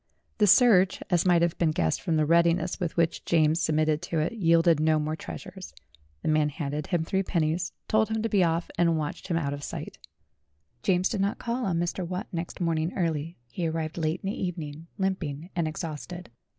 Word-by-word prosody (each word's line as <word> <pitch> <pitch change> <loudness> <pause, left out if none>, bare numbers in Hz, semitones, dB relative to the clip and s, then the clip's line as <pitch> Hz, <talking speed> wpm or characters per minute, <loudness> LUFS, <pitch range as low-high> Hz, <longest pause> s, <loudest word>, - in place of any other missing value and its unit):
The 210 - +5
search, 195 -4 +5
as 175 +1 +3
might 175 -1 +5
have 170 -1 +1
been 170 - +3
guessed 85 - 0
from 170 -3 0
the 155 - +3
readiness 170 +2 +2
with 175 -2 -3
which 170 -1 +1
James 160 0 +2
submitted 155 -1 +1
to 170 -2 -3
it, 155 +5 +1
yielded 165 -5 +4
no 155 0 +3
more 155 +1 -1
treasures. 185 +3 -9 0.5
The - - -3
man 155 -1 +3
handed 145 0 -4
him 175 -3 0
three 190 +3 0
pennies, 170 -1 -1 0.2
told 220 0 +2
him 220 0 -1
to - - +1
be 200 -4 +3
off, 165 0 0
and 170 -2 +3
watched 155 +4 -4
him 170 -3 0
out 140 -4 -1
of 145 0 -7
sight. - - -6 0.8
James 180 +3 +2
did 195 - -2
not 200 +1 0
call 240 +1 -2
on 175 -3 0
Mr. 175 +2 -2
Watt 180 +5 -4
next 170 -2 -5
morning 165 -1 0
early; 165 -2 -2
he 170 +3 -2
arrived 160 -1 -3
late 160 +2 -1
in 195 - -1
the - - -5
evening, 165 -3 -5
limping 180 -4 -2
and 170 -2 0
exhausted. 165 +1 -6
170 Hz, 205 wpm, -27 LUFS, 155-185 Hz, 0.8 s, The